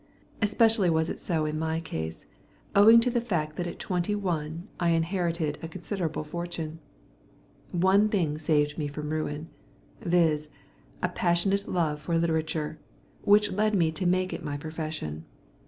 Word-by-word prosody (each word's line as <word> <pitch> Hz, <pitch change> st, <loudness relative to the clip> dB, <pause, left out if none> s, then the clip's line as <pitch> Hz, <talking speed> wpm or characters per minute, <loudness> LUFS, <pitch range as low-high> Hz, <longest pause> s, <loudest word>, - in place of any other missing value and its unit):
Especially 215 Hz, -2 st, +4 dB
was 160 Hz, 0 st, +1 dB
it -, -, -6 dB
so 160 Hz, -4 st, 0 dB
in 155 Hz, 0 st, -2 dB
my 160 Hz, 0 st, -1 dB
case, 80 Hz, -, -5 dB, 0.5 s
owing 220 Hz, +3 st, +9 dB
to 250 Hz, +1 st, +1 dB
the 240 Hz, -1 st, +1 dB
fact 160 Hz, -10 st, -2 dB
that 175 Hz, +1 st, -2 dB
at 175 Hz, -, -6 dB
twenty 180 Hz, +2 st, -1 dB
one 170 Hz, -3 st, -3 dB
I 175 Hz, -2 st, +2 dB
inherited 165 Hz, -2 st, 0 dB
a 165 Hz, -, -4 dB
considerable 165 Hz, -2 st, -3 dB
fortune. 165 Hz, 0 st, -5 dB, 0.9 s
One 190 Hz, +4 st, +4 dB
thing 160 Hz, -8 st, 0 dB
saved 150 Hz, -1 st, +1 dB
me 150 Hz, -, -1 dB
from 150 Hz, +1 st, -5 dB
ruin, 155 Hz, 0 st, -3 dB, 0.5 s
viz. 160 Hz, -3 st, +2 dB, 0.5 s
a -, -, +2 dB
passionate 195 Hz, +3 st, +1 dB
love 155 Hz, -5 st, 0 dB
for 165 Hz, +2 st, 0 dB
literature, 160 Hz, -2 st, -1 dB, 0.5 s
which 205 Hz, +1 st, +5 dB
led 215 Hz, +2 st, +1 dB
me 165 Hz, -4 st, +3 dB
to 170 Hz, +3 st, -1 dB
make 185 Hz, +1 st, +1 dB
it -, -, -5 dB
my 145 Hz, -1 st, -3 dB
profession. 155 Hz, -, -5 dB
165 Hz, 155 wpm, -28 LUFS, 155-185 Hz, 0.9 s, owing